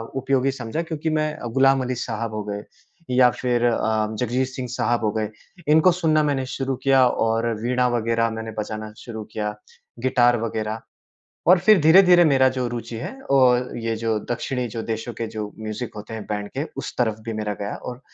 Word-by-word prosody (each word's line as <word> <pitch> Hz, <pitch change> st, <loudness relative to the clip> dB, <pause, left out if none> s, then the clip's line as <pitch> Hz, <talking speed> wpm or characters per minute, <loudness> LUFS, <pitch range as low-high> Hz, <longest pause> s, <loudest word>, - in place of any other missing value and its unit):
उपयोगी 135 Hz, 0 st, +1 dB
समझा 130 Hz, +4 st, -4 dB
क्योंकि 160 Hz, -1 st, -3 dB
मैं 155 Hz, -1 st, 0 dB
अ, -, -, -6 dB
ग़ुलाम 135 Hz, +3 st, +3 dB
अली 125 Hz, 0 st, -2 dB
साहब 115 Hz, -1 st, -4 dB
हो 105 Hz, -1 st, -3 dB
गए 105 Hz, 0 st, -5 dB, 0.5 s
या 125 Hz, 0 st, +5 dB
फ़िर 120 Hz, -1 st, 0 dB
अ, 120 Hz, -1 st, +2 dB, 0.4 s
जगजीत 125 Hz, +2 st, 0 dB
सिंह 130 Hz, -1 st, -6 dB
साहब 120 Hz, -2 st, 0 dB
हो 105 Hz, -, +2 dB
गए 110 Hz, -1 st, -2 dB, 0.4 s
इनको 160 Hz, +4 st, +6 dB
सुनना 155 Hz, -3 st, +2 dB
मैंने 135 Hz, -3 st, 0 dB
शुरू 135 Hz, 0 st, -2 dB
किया 135 Hz, -2 st, +5 dB
और 115 Hz, -1 st, 0 dB
वीणा 125 Hz, +1 st, +1 dB
वगैरह 115 Hz, 0 st, +1 dB
मैंने 110 Hz, 0 st, -5 dB
बजाना 110 Hz, 0 st, -5 dB
शुरू 110 Hz, -3 st, -7 dB
किया। 105 Hz, -1 st, -3 dB, 0.4 s
गिटार 120 Hz, -1 st, +3 dB
वगैरह 110 Hz, -1 st, -3 dB, 0.7 s
और 180 Hz, -, +8 dB
फ़िर 195 Hz, +2 st, +5 dB
धीरे-धीरे 175 Hz, +2 st, +7 dB
मेरा 135 Hz, -4 st, +5 dB
जो 125 Hz, -, 0 dB
रुचि 115 Hz, -1 st, -5 dB
है 120 Hz, -, -5 dB, 0.2 s
और 125 Hz, -2 st, +3 dB
ये 115 Hz, -1 st, -2 dB
जो 110 Hz, -1 st, 0 dB
दक्षिणी 125 Hz, +1 st, -2 dB
जो 110 Hz, +1 st, -5 dB
देशों 115 Hz, +1 st, -4 dB
के 115 Hz, +1 st, -3 dB
जो 110 Hz, -1 st, -5 dB
म्यूजिक 110 Hz, +2 st, -5 dB
होते 105 Hz, +2 st, -7 dB
हैं 110 Hz, -2 st, -6 dB
बैंड 105 Hz, -1 st, -2 dB
के 140 Hz, -, 0 dB
उस -, -, -5 dB
तरफ 110 Hz, -3 st, +1 dB
भी 115 Hz, -, -2 dB
मेरा 105 Hz, -1 st, -2 dB
गया 100 Hz, +1 st, -3 dB
और 125 Hz, 0 st, -8 dB
120 Hz, 190 wpm, -23 LUFS, 110-135 Hz, 0.7 s, और